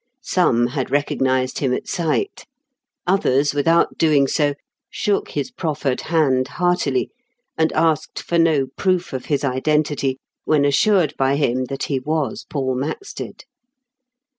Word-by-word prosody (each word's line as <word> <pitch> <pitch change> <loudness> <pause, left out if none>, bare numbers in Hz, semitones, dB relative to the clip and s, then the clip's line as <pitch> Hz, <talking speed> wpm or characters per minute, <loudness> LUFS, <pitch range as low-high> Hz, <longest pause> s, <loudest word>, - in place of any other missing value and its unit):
Some 120 - +2
had 130 +1 -3
recognised 130 -2 0
him 130 -3 +1
at - - -6
sight; 190 - -2 0.6
others, 145 -7 +2
without 165 +4 +2
doing 150 -4 +4
so, 145 +1 +1 0.3
shook 205 -1 -1
his 255 - -3
proffered 150 - -2
hand 135 -6 +1
heartily, 150 -4 0 0.4
and 160 0 +1
asked 160 -3 +1
for 170 - -1
no 160 -5 +3
proof 185 -4 0
of 130 - -4
his 145 -2 -1
identity, 140 0 0 0.3
when 150 -2 +2
assured 160 +3 +3
by 135 +1 +2
him 130 -3 0
that 135 +1 -5
he 135 -2 -1
was 150 +1 -2
Paul 135 -3 -1
Maxted. 155 - -5
145 Hz, 135 wpm, -21 LUFS, 135-165 Hz, 0.6 s, doing